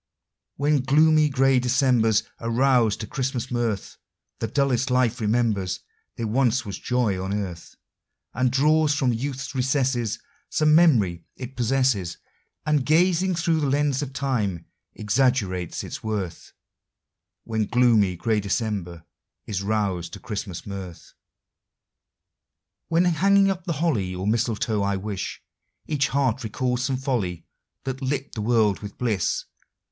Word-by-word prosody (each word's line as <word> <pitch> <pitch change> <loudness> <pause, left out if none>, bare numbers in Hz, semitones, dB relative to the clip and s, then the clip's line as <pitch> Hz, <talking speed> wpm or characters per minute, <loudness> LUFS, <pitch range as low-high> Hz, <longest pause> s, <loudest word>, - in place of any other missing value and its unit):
When 145 +1 +2
gloomy, 155 +3 +4
gray 135 -1 +3
Decembers 125 -4 +3 0.2
are 115 - -4
roused 120 -3 +3
to - - -3
Christmas 130 0 -3
mirth, 115 -5 -2 0.4
The 115 - -1
dullest 135 +1 +1
life 125 -1 +1
remembers 105 -4 0 0.3
there 115 - -3
once 125 +2 +1
was 100 -2 -6
joy 110 -7 0
on 95 - -3
earth, 95 -5 -5 0.6
And 125 +2 +1
draws 150 +3 +3
from 130 -4 +1
youth's 135 +4 -4
recesses 130 -4 0 0.3
Some 155 0 +3
memory 110 - +4
it 130 +1 -8
possesses, 120 -7 +1 0.5
And, 150 -3 +2
gazing 180 +4 +3
through 165 -1 +1
the 145 -2 0
lens 145 0 +1
of 140 -2 -4
time, 110 - -2 0.3
exaggerates 105 -6 0
its - - -7
worth, 100 -6 -4 0.9
When 110 -1 -1
gloomy, 115 -7 +3
gray 110 +5 0
December 100 -5 -3 0.4
is 100 -2 -3
roused 100 -4 -1
to - - -7
Christmas 100 -4 -6
mirth. 95 -4 -8 1.7
When 165 +2 +2
hanging 195 +3 +4
up 185 -2 -5
the 170 - -1
holly 130 - 0
or 90 +1 -4
mistletoe, 110 -1 0
I 100 0 0
wis 95 -1 -4 0.5
Each 145 -2 0
heart 130 -3 0
recalls 125 +3 -1
some 130 -1 0
folly 110 - -2 0.4
that 130 0 -4
lit 135 +1 -2
the 110 - -4
world 110 -3 +2
with 100 -1 -9
bliss. 110 -8 -1
120 Hz, 135 wpm, -24 LUFS, 105-135 Hz, 1.7 s, gloomy